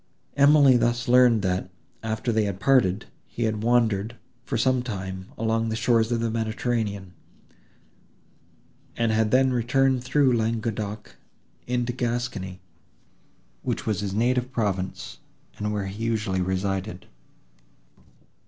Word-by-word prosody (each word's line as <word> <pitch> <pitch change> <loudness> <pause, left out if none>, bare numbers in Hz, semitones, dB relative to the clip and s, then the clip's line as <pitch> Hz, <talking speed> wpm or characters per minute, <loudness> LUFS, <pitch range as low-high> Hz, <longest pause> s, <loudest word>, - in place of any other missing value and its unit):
Emily 140 -2 +6
thus 120 0 0
learned 120 -3 +5
that, 90 0 -1 0.3
after 110 +2 -2
they 110 -1 +1
had 100 -2 -4
parted, 110 -6 +2 0.2
he 120 - -4
had 110 -1 -1
wandered, 115 -2 +1 0.3
for 115 - -2
some 130 +2 +2
time, 95 -5 -6
along 115 0 0
the 110 - -2
shores 115 0 +2
of 115 -1 0
the 115 -1 -1
Mediterranean, 110 -4 -2 1.8
and 115 -1 +1
had 110 0 +2
then 130 +2 +3
returned 125 +1 +1
through 130 0 +3
Languedoc 110 - -3 0.5
into 120 0 -1
Gascony, 120 -6 -3 1.0
which - - -3
was 105 -2 -1
his 100 -1 -3
native 125 +3 +1
province, 100 -7 -3 0.4
and 105 0 -2
where 105 -2 -2
he 100 +4 -6
usually 105 -5 -1
resided. 95 0 -2
115 Hz, 125 wpm, -25 LUFS, 100-120 Hz, 1.8 s, Emily